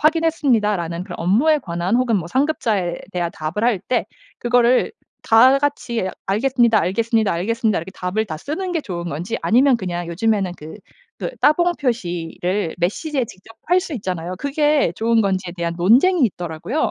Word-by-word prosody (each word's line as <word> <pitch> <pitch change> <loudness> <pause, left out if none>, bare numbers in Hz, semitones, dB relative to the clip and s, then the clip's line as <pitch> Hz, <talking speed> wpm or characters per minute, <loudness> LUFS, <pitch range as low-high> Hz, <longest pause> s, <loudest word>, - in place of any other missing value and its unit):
확인했습니다."라는 240 - +1
그런 - - -8
업무에 250 - +3
관한 175 0 -1
혹은 250 -3 +2
뭐 175 -4 -3
상급자에 220 - 0 0.2
대한 175 -1 -1
답을 160 +8 -3
할 235 -6 +2
때 250 - -1 0.3
그거를 245 +1 +2 0.3
다 255 +5 +6
같이 240 -8 -2 0.2
"알겠습니다. 235 +2 +2
알겠습니다. 225 +2 +1
알겠습니다." 215 +5 0
이렇게 170 +4 -7
답을 190 +5 -2
다 160 -5 -5
쓰는 340 - -4
게 330 - 0
좋은 175 -6 -5
건지 175 +10 -3
아니면 255 +3 +4
그냥 175 -4 -4
요즘에는 195 +1 0
그 155 +1 -10 0.4
그 - - -3
따봉 345 +3 +3
표시를 180 - -2
메시지에 255 - -1
직접 200 +2 -15
할 355 +3 +4
수 360 -3 -7
있잖아요. 185 -5 -4
그게 295 - +1
좋은 230 0 +2
건지에 190 -3 -1
대한 170 -1 -2
논쟁이 260 - +4
있더라고요. 175 - -3
220 Hz, 380 characters per minute, -20 LUFS, 180-265 Hz, 0.4 s, 다